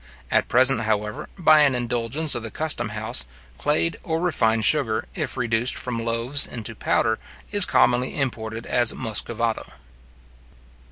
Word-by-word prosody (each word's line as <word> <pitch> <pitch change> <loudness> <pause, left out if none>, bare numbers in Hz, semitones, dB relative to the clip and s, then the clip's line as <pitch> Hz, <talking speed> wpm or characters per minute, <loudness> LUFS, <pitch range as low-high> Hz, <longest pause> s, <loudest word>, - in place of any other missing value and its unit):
At - - +1
present, 130 -1 +3
however, 105 -1 -3
by 155 -4 +5
an 140 -3 +3
indulgence 125 +5 -1
of 120 - -2
the 110 - -6
custom 130 -5 0
house, 110 +3 0 0.4
clayed 155 +2 0
or 160 0 -3
refined 115 -10 0
sugar, 120 -8 +2
if - - -4
reduced 115 +2 +1
from 115 -2 -4
loaves 115 +5 +3
into 115 -2 -7
powder, 110 +1 -1 0.3
is 205 -2 +7
commonly 130 0 +1
imported 115 -4 -4
as 120 -2 +1
Muscovado. 115 -1 -2
120 Hz, 135 wpm, -22 LUFS, 110-140 Hz, 0.4 s, is